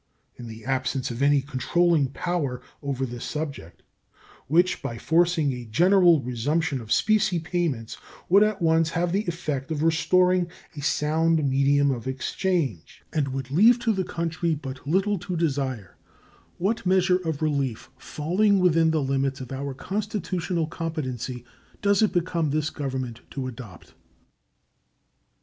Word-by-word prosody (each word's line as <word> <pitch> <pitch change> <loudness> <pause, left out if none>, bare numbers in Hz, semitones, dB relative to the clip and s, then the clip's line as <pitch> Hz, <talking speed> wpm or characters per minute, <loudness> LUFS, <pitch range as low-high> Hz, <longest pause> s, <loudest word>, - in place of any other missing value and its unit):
In 120 - -9
the 110 -1 -10
absence 130 -1 -1
of 120 +2 -5
any 140 0 +4
controlling 150 +3 +1
power 140 -3 -2 0.2
over 135 -2 -2
this 120 -1 -7
subject, 140 - -6 0.6
which, 175 +6 +2
by 115 - -5
forcing 165 -1 +2
a 125 -1 -6
general 175 - +4
resumption 140 +4 -1
of 110 -1 -11
specie 215 -4 +3
payments, 160 -9 -2 0.3
would 195 +3 +6
at 215 -4 +1
once 160 0 +3
have 170 +1 -1
the 205 +3 -1
effect 155 -6 -3
of 155 -1 -2
restoring 180 +2 +3 0.3
a 145 - -6
sound 155 +1 +1
medium 140 +1 +3
of 120 -2 -4
exchange 135 - -2
and 150 -3 +1
would 135 -1 -5
leave 220 - +6
to 225 -2 +2
the 190 -2 -1
country 170 -1 -2
but 135 -2 -8
little 195 +5 +1
to 180 0 -4
desire, 135 - -2 0.6
what 205 +6 -1
measure 185 -1 +3
of 160 -4 -3
relief 140 -6 -1
falling 195 +7 +1
within 165 -3 +4
the 160 -2 +1
limits 135 0 -1
of 130 -1 -8
our 135 0 -4
constitutional 185 -2 -2
competency 130 -7 -5 0.4
does 200 0 +3
it 215 - +3
become 170 -3 0
this 155 +1 -1
Government 130 -5 -4
to 135 -2 -5
adopt? 115 -8 -10
155 Hz, 145 wpm, -25 LUFS, 135-175 Hz, 0.6 s, would